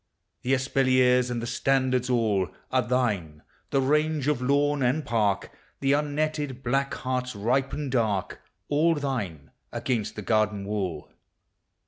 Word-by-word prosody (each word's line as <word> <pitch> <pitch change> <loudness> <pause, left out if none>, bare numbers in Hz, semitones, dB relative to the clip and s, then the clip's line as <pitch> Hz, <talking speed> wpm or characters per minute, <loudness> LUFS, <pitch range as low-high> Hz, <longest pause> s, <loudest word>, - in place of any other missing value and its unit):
The 130 +2 +2
espaliers 130 -1 +3
and 120 -1 -3
the - - -2
standards 130 0 +1
all 110 -7 +1 0.2
Are 130 - +3
thine; 105 -11 -1 0.3
the 135 - +2
range 150 +1 +1
of 150 -4 +1
lawn 145 +2 +2
and 135 +4 +1
park: 105 -4 0 0.3
The 135 0 +1
unnetted 145 -2 -1
black 135 +3 0
hearts 125 -1 -3
ripen 130 +6 -1
dark; 110 -7 0 0.3
All 160 +3 +3
thine, 110 - -4 0.2
against 110 -5 -2
the 105 - -6
garden 105 -2 +1
wall. 95 -7 -3
125 Hz, 130 wpm, -26 LUFS, 110-140 Hz, 0.3 s, espaliers